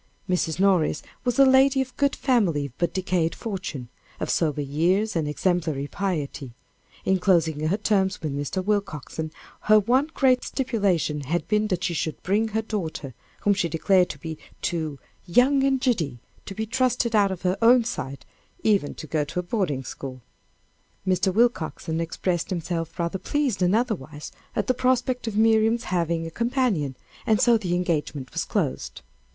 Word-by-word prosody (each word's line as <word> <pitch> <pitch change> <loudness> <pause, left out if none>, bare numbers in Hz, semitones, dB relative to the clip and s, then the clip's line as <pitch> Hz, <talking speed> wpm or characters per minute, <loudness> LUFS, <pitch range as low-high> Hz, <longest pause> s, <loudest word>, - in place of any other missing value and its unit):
Mrs. 180 -3 0
Morris 185 -6 +2 0.2
was 245 0 0
a 275 - +7
lady 265 +1 +5
of 260 -1 -2
good 280 -1 +1
family, 175 - +1
but 175 - +1
decayed 180 -3 0
fortune, 185 - -5 0.3
of - - -1
sober 150 -3 0
years 180 +10 +1
and 160 -3 0
exemplary 155 -3 0
piety. 145 -8 -3 0.5
In 190 0 +2
closing 160 -5 +2
her 190 +6 +1
terms 195 -3 +1
with 150 -3 -3
Mr. 145 +6 -3
Willcoxen, 160 -6 -2 0.3
her 215 0 +5
one 250 +8 +2
great 255 -2 +3
stipulation 200 - 0
had 165 +3 -1
been 210 +2 +2
that 185 -3 -2
she 175 - 0
should 160 -1 -2
bring 210 +4 +1
her 220 +1 -1
daughter, 165 - -4 0.3
whom 205 - +3
she 180 -4 0
declared 180 +3 +3
to - - -6
be 160 +2 -7 0.2
too 160 -4 -2 0.3
"young 265 +9 +4
and 270 -1 +2
giddy" 180 - 0 0.3
to 195 - -6
be 220 - -2
trusted 245 -1 +1
out 205 -2 +4
of 190 -2 -5
her 185 0 +2
own 240 +1 +6
sight, 140 - -5 0.4
even 200 -9 +2
to - - -8
a 155 0 0
good 175 +2 -4
boarding 165 - 0
school. 130 -1 -8 0.8
Mr. 185 0 +2
Willcoxen 180 -7 0
expressed 170 +1 -2
himself 170 -2 -3
rather 170 +2 -2
pleased 290 -2 -1
than 180 +2 +3
otherwise 165 - -2 0.2
at - - 0
the 255 - +2
prospect 255 -1 0
of 215 -2 -2
Miriam's 225 +1 +3
having 170 -1 0
a 165 - -6
companion, 235 - 0 0.3
and 215 -2 +4
so 240 -1 +5
the 185 -6 0
engagement 155 -6 -2
was - - -1
closed. 65 -2 -2
185 Hz, 165 wpm, -25 LUFS, 160-225 Hz, 0.8 s, a